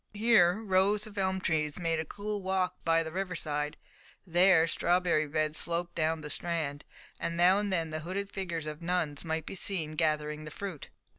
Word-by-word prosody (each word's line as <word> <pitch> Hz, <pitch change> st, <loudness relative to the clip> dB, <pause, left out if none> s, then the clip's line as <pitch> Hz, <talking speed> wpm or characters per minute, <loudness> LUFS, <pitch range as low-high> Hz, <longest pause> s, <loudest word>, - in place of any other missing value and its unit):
Here 210 Hz, -4 st, +4 dB
rows 200 Hz, +1 st, +2 dB
of 215 Hz, -1 st, -11 dB
elm 190 Hz, 0 st, +1 dB
trees 155 Hz, -4 st, 0 dB
made 165 Hz, -2 st, 0 dB
a 160 Hz, -, -2 dB
cool 205 Hz, +4 st, -4 dB
walk 185 Hz, -1 st, -1 dB
by 165 Hz, 0 st, +3 dB
the 160 Hz, -, -6 dB
river 185 Hz, +1 st, -3 dB
side, 150 Hz, -2 st, -3 dB, 0.5 s
there 175 Hz, -1 st, +5 dB
strawberry 170 Hz, -2 st, +2 dB
beds 155 Hz, +1 st, 0 dB
sloped 170 Hz, 0 st, -1 dB
down 160 Hz, 0 st, 0 dB
the 150 Hz, -1 st, -5 dB
Strand, 155 Hz, -4 st, -1 dB, 0.3 s
and 170 Hz, -, -3 dB
now 180 Hz, +3 st, +5 dB
and 205 Hz, -1 st, -2 dB
then 165 Hz, -3 st, 0 dB
the 155 Hz, -, -3 dB
hooded 190 Hz, +5 st, -4 dB
figures 170 Hz, -5 st, -3 dB
of 155 Hz, +1 st, -6 dB
nuns 170 Hz, -4 st, -1 dB
might 160 Hz, -1 st, -2 dB
be -, -, -6 dB
seen 180 Hz, -5 st, -3 dB
gathering 155 Hz, -1 st, -1 dB
the 155 Hz, -, -7 dB
fruit. 180 Hz, -1 st, -7 dB
170 Hz, 190 wpm, -30 LUFS, 155-190 Hz, 0.5 s, there